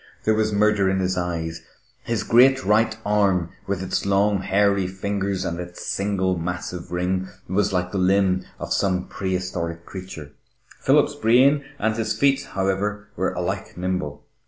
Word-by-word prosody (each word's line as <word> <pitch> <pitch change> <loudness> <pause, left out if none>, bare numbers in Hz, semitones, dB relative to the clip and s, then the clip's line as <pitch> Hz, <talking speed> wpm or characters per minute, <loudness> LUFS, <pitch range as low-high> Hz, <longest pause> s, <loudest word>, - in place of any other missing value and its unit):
There 110 - +3
was 110 0 +1
murder 105 -1 +3
in 95 0 +1
his 95 0 0
eyes. 85 -2 -3 0.4
His 115 -2 -2
great 130 +3 +5
right 110 +2 +3
arm, 100 -5 +2 0.2
with 95 -1 -2
its 95 - -1
long, 100 +1 +2
hairy 100 0 +2
fingers 95 0 -2
and 85 +1 -3
its 90 0 -7
single 95 -2 0
massive 90 0 -5
ring, 90 +1 -1 0.2
was 95 +3 +1
like 90 -1 -1
the 100 - -1
limb 95 0 +3
of - - -3
some 90 -2 +1
prehistoric 90 -3 -3
creature. 90 -6 -8 0.5
Philip's - - +3
brain 130 +6 +4
and 110 -3 0
his 110 -1 -1
feet, 135 +3 +2
however, 100 +2 -1
were - - -1
alike - - -4
nimble. 90 -5 -3
95 Hz, 155 wpm, -23 LUFS, 90-105 Hz, 0.5 s, great